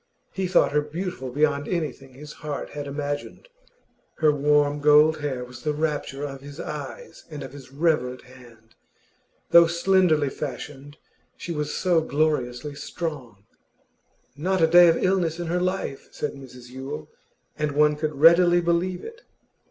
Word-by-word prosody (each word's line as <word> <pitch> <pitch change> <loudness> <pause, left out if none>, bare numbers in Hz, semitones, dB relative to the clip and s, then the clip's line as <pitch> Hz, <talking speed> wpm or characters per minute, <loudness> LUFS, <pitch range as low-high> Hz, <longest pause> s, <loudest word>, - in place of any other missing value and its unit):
He 190 -1 -2
thought 180 - +3
her 150 +1 +2
beautiful 155 -2 -5
beyond 145 +2 0
anything 145 -6 -4
his 150 +2 -10
heart 150 -3 -5
had 145 -1 -6
imagined; 145 - -5 0.7
her 155 -2 +3
warm 145 0 +2
gold 150 +2 +5
hair 130 -4 -3
was 125 0 -12
the 150 - -1
rapture 145 -2 -2
of 135 -2 -6
his 145 +2 -11
eyes - - -7
and 150 -3 -7
of 135 -1 -9
his 140 -2 -12
reverent 140 -4 0
hand. 120 -3 -17 0.8
Though 170 -1 +8
slenderly 170 -4 +2
fashioned, 145 +1 -7 0.4
she 175 - -6
was 150 -2 -3
so 175 -3 +2
gloriously 150 -3 -1
strong. 140 - -6 0.9
'Not 185 +5 -1
a 165 - +5
day 175 +2 +7
of 165 - +4
illness 180 -3 0
in 175 - -3
her 175 +2 -1
life,' 185 -7 -3
said 150 - -4
Mrs 125 -3 -12
Yule, 140 +4 -7 0.5
and 150 -1 -2
one 150 +1 +4
could 150 0 -3
readily 170 +4 +6
believe 175 +1 0
it. 460 +2 -10
150 Hz, 150 wpm, -24 LUFS, 140-170 Hz, 0.9 s, Though